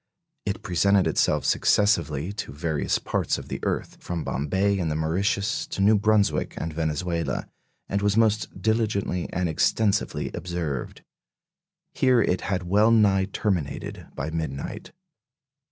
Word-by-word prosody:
It 100 - -2
presented 95 +2 +3
itself - - +1
successively 85 -5 +2
to 105 - -5
various 75 +1 -1
parts - - -1
of - - -9
the - - -4
earth, - - -2
from 85 -2 -4
Bombay 95 +9 0
and 85 -3 0
the 75 - -1
Mauritius 95 +6 0
to - - -6
New 105 +3 +5
Brunswick 105 0 +2
and 80 0 -4
Venezuela, 85 +2 -2 0.4
and 100 - -1
was 105 +1 +1
most 110 -1 +1
diligently 105 -5 0
and 90 0 0
extensively 100 +6 +1
observed. 85 -7 -4 0.9
Here 130 -2 +3
it 95 -4 +1
had 95 -2 -2
well 105 +5 +4
nigh 100 -4 +4
terminated 95 -6 -3
by 75 +4 -3
midnight. 80 -4 -5
95 Hz, 135 wpm, -25 LUFS, 80-105 Hz, 0.9 s, New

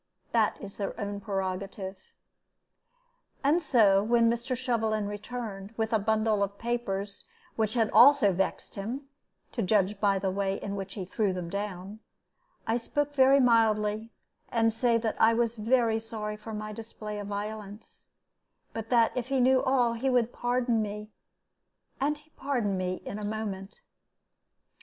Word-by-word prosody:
That 225 -2 +2
is 200 -1 -9
their 200 +3 -4
own 205 -1 -3
prerogative. 195 -1 -3 1.5
And 300 +5 +3
so, 210 -10 +4
when 230 +2 +3
Mr. 240 +2 -2
Shovelin 225 -4 0
returned, 205 -1 -6
with 225 0 -1
a 220 - +4
bundle 215 0 +1
of 200 0 -1
papers 205 -4 -3 0.3
which 220 +1 0
had 225 -3 +2
also 270 -7 +7
vexed 190 +2 -2
him 230 +8 -4 0.5
to 235 - -2
judge 200 0 +2
by 200 -1 +3
the 190 0 -1
way 195 0 -1
in 200 0 -4
which 195 -1 -6
he 190 -4 -4
threw 195 +1 0
them 175 -2 -5
down 200 0 -5 0.7
I 225 +1 +1
spoke 290 +4 -2
very 270 0 +6
mildly, 220 -3 +3 0.4
and 225 -2 +2
said 230 0 +2
that 220 - -1
I 225 +1 +6
was 235 0 +1
very 225 0 +2
sorry 220 -1 -5
for 215 +1 -9
my 215 0 -5
display 215 -1 -7
of 205 - -6
violence, 210 +1 -7 0.7
but 225 0 -5
that 230 -2 +4
if 250 -1 -2
he 270 0 +1
knew 260 +1 +4
all, 250 -3 +2
he 245 +4 -1
would 245 -2 +2
pardon 245 -2 +1
me; 210 0 -5 0.9
and 295 +2 +1
he 300 +1 -24
pardoned 245 -10 -1
me 185 0 -3
in 205 - -5
a - - -6
moment. 205 -2 -5
220 Hz, 155 wpm, -29 LUFS, 200-235 Hz, 1.5 s, also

